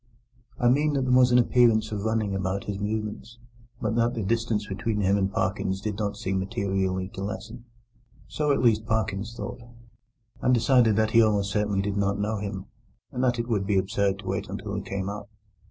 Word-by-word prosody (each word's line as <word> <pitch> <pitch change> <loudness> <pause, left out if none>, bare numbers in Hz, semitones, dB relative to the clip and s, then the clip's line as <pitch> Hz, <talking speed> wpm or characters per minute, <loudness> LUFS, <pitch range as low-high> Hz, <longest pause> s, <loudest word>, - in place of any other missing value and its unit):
I 120 - +2
mean 145 +4 +3
that 135 -2 +1
there 130 - 0
was 125 0 +5
an 125 - +6
appearance 120 -3 +4
of 105 -2 -3
running 110 -2 0
about 95 +1 -2
his 100 -1 -4
movements, 110 +2 -4 0.4
but - - -1
that 120 +1 +2
the 110 - -2
distance 115 0 0
between 105 +2 -2
him 100 0 +3
and 95 -1 0
Parkins 95 -1 -1
did 105 0 -4
not 105 -1 -2
seem 95 -3 -1
materially 95 -1 -1
to 95 - -7
lessen. 105 +4 -6 0.6
So, 150 -1 0
at 135 - +1
least, 110 -2 +3
Parkins 110 -1 -1
thought, 120 - -6 0.8
and 125 - +4
decided 120 -2 +4
that 110 0 +2
he 115 - +6
almost 105 -2 +2
certainly 105 -2 0
did 100 0 -2
not 100 0 +1
know 105 +2 -1
him, 100 -2 -5 0.5
and 125 - -2
that 125 -1 +2
it 115 0 -2
would 100 -5 0
be 100 -1 +2
absurd 100 +1 +1
to - - -15
wait 95 0 -2
until 100 +1 -5
he 100 - -2
came 95 0 -4
up. 100 0 -6
105 Hz, 205 wpm, -26 LUFS, 100-115 Hz, 0.8 s, an